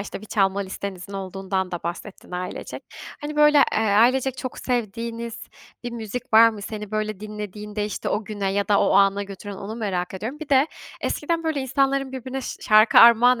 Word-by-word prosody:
işte 200 - -6
bir 215 - -11
çalma 195 -2 +1
listenizin 195 -1 -6
olduğundan 190 -1 -3
da 175 - -5
bahsettin 175 +4 -7
ailecek. 180 0 -6 0.4
Hani, 295 0 -5
böyle, 300 0 +6
eee, - - +1
ailecek 240 +5 +3
çok 255 -1 -6
sevdiğiniz 230 -1 -3 0.5
bir 240 - -3
müzik 230 +1 -6
var 225 +1 +9
mı, 215 -3 -7
seni 210 -1 -6
böyle 215 -2 -3
dinlediğinde 210 0 -5
işte 210 - -4
o 215 - -1
güne 200 -2 -3
ya 200 0 -1
da 205 -1 +4
o - - +2
ana 200 0 +4
götüren, 200 0 -8
onu 210 +4 -7
merak 190 -5 -3
ediyorum. 225 +10 -5
Bir 315 - -7
de, 275 +1 +4 0.3
eskiden 330 +2 -1
böyle 315 -3 -1
insanların 270 +1 0
birbirine 260 +1 -5
şa - - -6
şarkı 215 +1 +6
armağan 235 +1 +7
215 Hz, 185 wpm, -23 LUFS, 200-250 Hz, 0.5 s, var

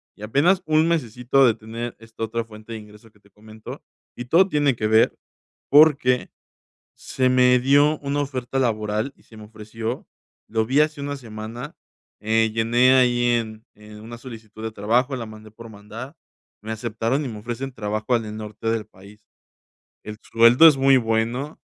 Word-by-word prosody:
y 105 - -13
apenas 165 - +2
1 155 +1 +2
mesecito 130 -3 +1
de 115 - +4
tener 115 +2 -7
esta 115 0 -9
otra 115 +1 -2
fuente 110 0 -12
de 110 - -6
ingreso 105 +1 -16
que 105 - -27
te 100 - -26
comento 110 +1 -12 0.3
y 120 - -7
todo 175 +9 +4
tiene 145 -5 +1
que 110 -1 -2
ver 110 +1 +3 0.5
porque 140 -4 +4 0.7
se 130 -1 -1
me 125 0 +4
dio 145 +3 +3
una 145 0 -2
oferta 135 -1 -4
laboral 110 +1 -1
y - - -26
se 110 - -17
me 105 - -11
ofreció 110 +2 -7 0.4
lo 110 0 0
vi 135 +4 +2
hace 150 -1 0
1 145 0 -4
semana, 115 +3 -9 0.4
eh, 110 +1 +1
llené 120 +3 +3
ahí 120 -1 +3
en, 110 -1 -4
eh, 105 0 -14
una 115 +2 -10
solicitud 110 -3 -11
de 110 -1 -4
trabajo, 120 +6 0
la 115 -2 -6
mandé 110 0 -13
por 115 +1 -12
mandar. 110 +8 -10 0.5
Me 110 +1 -5
aceptaron 115 +5 -2
y - - -4
me 110 -2 -7
ofrecen 125 +4 -5
trabajo 110 +2 -2
al 110 -2 -2
norte 110 +1 -5
del 115 -2 -2
país, 100 +3 -18 0.8
el 105 0 -8
sueldo 115 +7 +6
es 145 - +3
muy 135 0 +5
bueno, 115 +5 -2
115 Hz, 175 wpm, -22 LUFS, 110-130 Hz, 0.8 s, sueldo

